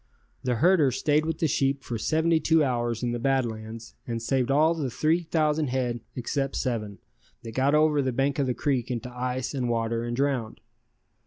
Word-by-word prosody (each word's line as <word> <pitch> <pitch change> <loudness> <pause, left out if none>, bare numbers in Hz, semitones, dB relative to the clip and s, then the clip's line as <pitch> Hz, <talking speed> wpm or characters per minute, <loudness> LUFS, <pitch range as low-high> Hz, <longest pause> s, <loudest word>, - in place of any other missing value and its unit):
The 125 -1 0
herder 160 +2 +4
stayed 150 +4 +1
with 160 -1 -2
the 160 - +1
sheep 135 -1 0
for 115 -2 -4
seventy 160 +4 +2
two 160 0 +3
hours 120 -3 -1
in 120 - 0
the 120 - -2
Bad 135 +1 +2
Lands 110 0 -7
and 115 -1 -2
saved 125 +2 0
all 155 +4 +4
the 150 -5 -2
3,000 155 +2 +1
head 125 -2 -1 0.2
except 135 +2 -2
seven, 110 -6 -2 0.5
that 115 - -7
got 135 +5 +2
over 150 -1 +4
the 130 -1 0
bank 135 +3 0
of 135 - +1
the 125 - -1
creek 135 -5 -1
into 125 0 -4
ice 125 +1 -2
and 125 -3 -1
water 115 0 -1
and 120 0 -3
drowned. 130 -4 -1
130 Hz, 190 wpm, -26 LUFS, 120-150 Hz, 0.5 s, herder